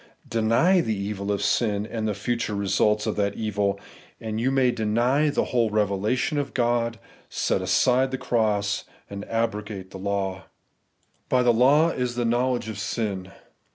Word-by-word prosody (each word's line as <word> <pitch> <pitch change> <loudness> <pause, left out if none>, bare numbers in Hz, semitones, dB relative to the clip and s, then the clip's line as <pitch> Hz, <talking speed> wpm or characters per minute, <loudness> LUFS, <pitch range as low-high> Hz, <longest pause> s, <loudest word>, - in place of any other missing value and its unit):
Deny 115 +12 +3
the 110 -8 -1
evil 100 0 -3
of 100 - -1
sin, 105 -3 +1
and 110 -1 -3
the 105 - -1
future 115 0 -2
re 100 0 -2
sults 105 +3 +2
of - - -1
that 100 -1 0
evil, 105 -2 -1 0.4
and 110 0 -4
you 130 - +2
may 135 -2 +3
deny 120 +7 +1
the 145 - +1
whole 120 -3 +1
revelation 105 - 0
of 140 - -4
God, 120 -1 +1 0.3
set - - 0
aside 130 +1 +3
the 130 - -3
cross, 105 -5 0 0.3
and 100 0 -5
abrogate 105 -4 -3
the 95 - -8
law. 95 -1 -2 0.8
'By 125 -1 +3
the 120 -1 +4
law 140 +8 +5
is 125 -3 -2
the 120 -1 -1
knowledge 120 0 0
of 110 -2 -5
sin.' 95 -2 -3
110 Hz, 165 wpm, -25 LUFS, 100-125 Hz, 0.8 s, law